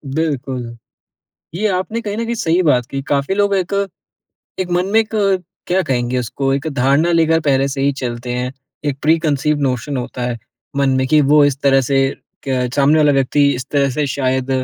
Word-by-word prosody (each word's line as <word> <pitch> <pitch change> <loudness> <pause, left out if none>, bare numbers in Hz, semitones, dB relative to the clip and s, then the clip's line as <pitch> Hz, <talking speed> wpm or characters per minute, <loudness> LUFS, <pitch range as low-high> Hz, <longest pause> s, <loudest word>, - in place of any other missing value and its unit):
बिल्कुल। 135 -6 -3 0.8
ये 205 +5 0
आपने 190 +4 -2
कहीं 210 -2 -4
न 230 - -2
कहीं 235 +1 -2
सही 180 -4 +1
बात 125 -7 +2
की। 135 - -3
काफ़ी 140 +6 0
लोग 205 0 +2
एक 185 0 -2 0.9
एक 180 -1 -3
मन 180 +1 +1
में 220 - +5
एक 220 - -3 0.6
क्या 185 +2 +2
कहेंगे 125 -4 -1
उसको? 135 +3 -2
एक 140 +3 -3
धारणा 140 +5 +2
लेकर 165 -1 +3
पहले 135 -3 +2
से 135 0 -4
ही 140 +1 +2
चलते 120 0 -4
हैं। 125 +1 -2 0.3
एक 140 -2 -2
प्रीकन्सीव्ड 150 -2 +1
नोशन 135 +1 -1
होता 125 0 -5
है 120 -1 -2 0.4
मन 140 -1 +2
में, 130 0 +1
कि 155 +3 +4
वो 145 +1 +5
इस 145 -2 +1
तरह 135 -1 +4
से 135 +1 0 0.5
क 125 -1 0
सामने 145 +2 +4
वाला 150 -1 +4
व्यक्ति 135 +1 +2
इस 125 - -4
तरह 140 -1 +2
से 145 +3 -1
शायद 130 -1 -1
140 Hz, 195 wpm, -18 LUFS, 130-160 Hz, 0.9 s, में